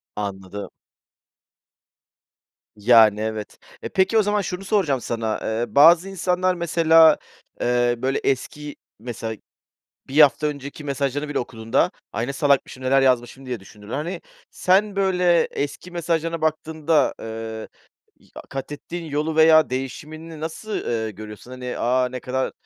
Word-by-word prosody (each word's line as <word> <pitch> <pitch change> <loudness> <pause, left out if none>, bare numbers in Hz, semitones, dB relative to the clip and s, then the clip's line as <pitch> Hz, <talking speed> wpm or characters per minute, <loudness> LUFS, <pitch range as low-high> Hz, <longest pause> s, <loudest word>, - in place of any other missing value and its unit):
Anladım. 100 -1 -5 2.1
Yani, 110 -1 +5
evet. 110 -1 -5 0.2
E, - - -5
peki 190 +4 +2
o - - +6
zaman 205 0 +1
şunu 180 +1 -5
soracağım 175 - +1
sana, 115 -2 -2
ııı, 115 +4 -3
bazı 170 +6 +7
insanlar 185 -1 0
mesela, 165 -2 +5 0.4
eee, 120 0 +2
böyle, 130 +3 -1
eski, 145 +2 -2 0.2
mesela, 115 -1 -5 0.7
1 145 +3 +4
hafta 145 +1 +5
önceki 145 0 -6
mesajlarını 140 +1 -2
bile - - -1
okuduğunda, 115 -2 0 0.2
"Ay, 115 +4 -2
ne 140 - -3
salakmışım, 140 -2 +1
neler 135 +1 +3
yazmışım" 130 0 +1
diye 125 -4 -4
düşünürler, 105 +2 -12
hani. 160 +6 -4 0.3
Sen, 200 +2 +2
böyle, 180 -3 +3
eski 145 +5 -5
mesajlarına 165 -1 -2
baktığında, 155 -1 +1
ııı, 110 0 -6 0.5
i - - -24
a - - -7
katettiğin 150 +5 -6
yolu 155 +1 -2
veya 160 0 +6
değişimini 155 +5 -6
nasıl, 165 +7 -6
ııı, 110 -2 -2
görüyorsun? 105 +4 -10
Hani, 125 -1 -6
"A, 125 +1 +1
ne 130 - -6
kadar 130 +1 -2
140 Hz, 135 wpm, -22 LUFS, 120-165 Hz, 2.1 s, bazı